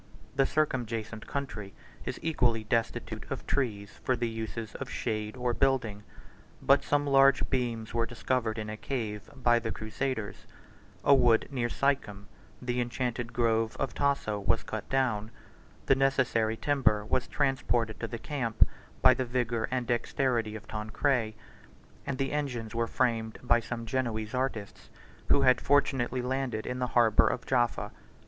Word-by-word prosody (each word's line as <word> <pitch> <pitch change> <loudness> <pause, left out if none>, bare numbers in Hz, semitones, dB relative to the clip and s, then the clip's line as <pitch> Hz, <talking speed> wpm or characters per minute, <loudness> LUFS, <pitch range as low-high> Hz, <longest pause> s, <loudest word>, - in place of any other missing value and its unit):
The 135 0 +3
circumjacent 115 -7 -1
country 125 -8 -5 0.3
is - - -3
equally 120 -8 +2
destitute 115 +1 -2
of - - -4
trees 105 -7 -2
for 130 - +2
the 120 0 -1
uses 115 0 -5
of 135 - -6
shade 110 0 -3
or 125 -1 0
building, 120 -6 +1 0.6
but 140 +1 +4
some 145 0 +1
large 135 -1 +5
beams 120 -4 -1
were 115 0 +1
discovered 115 -1 -1
in 110 -1 -4
a 105 - -4
cave 110 -5 -4
by 120 -2 +3
the 115 -1 -3
crusaders: 110 0 -4 0.6
a 140 - +7
wood 120 -4 +4
near 120 -3 -1
Sichem, 120 -8 0 0.3
the 125 0 -1
enchanted 120 -1 -2
grove 115 -1 +1
of 135 - -1
Tasso, 140 -7 0
109 100 - -9
was - - +3
cut - - -5
down: 120 -6 +1 0.6
the - - +5
necessary 130 -5 +2
timber 130 -8 +2
was 125 +3 0
transported 120 -5 0
to 115 - -3
the 115 - -5
camp 120 -4 +1 0.4
by 130 - +9
the 130 - -1
vigor 120 -2 -1
and 125 -1 -1
dexterity 120 -2 0
of 110 - -9
Tancred; 110 +1 0 0.7
and 140 - -2
the 135 0 -1
engines 125 -7 -3
were 115 0 0
framed 115 -3 0
by 120 -1 +4
some 115 0 -5
Genoese 110 -3 -2
artists, 125 -6 -3 0.4
who 140 - +4
had 130 -2 +5
fortunately 130 -3 +2
landed 125 -4 -2
in 125 0 -3
the 125 - 0
harbor 115 -3 +5
of 125 - -2
Jaffa. 120 -3 +1
120 Hz, 155 wpm, -29 LUFS, 110-130 Hz, 0.7 s, by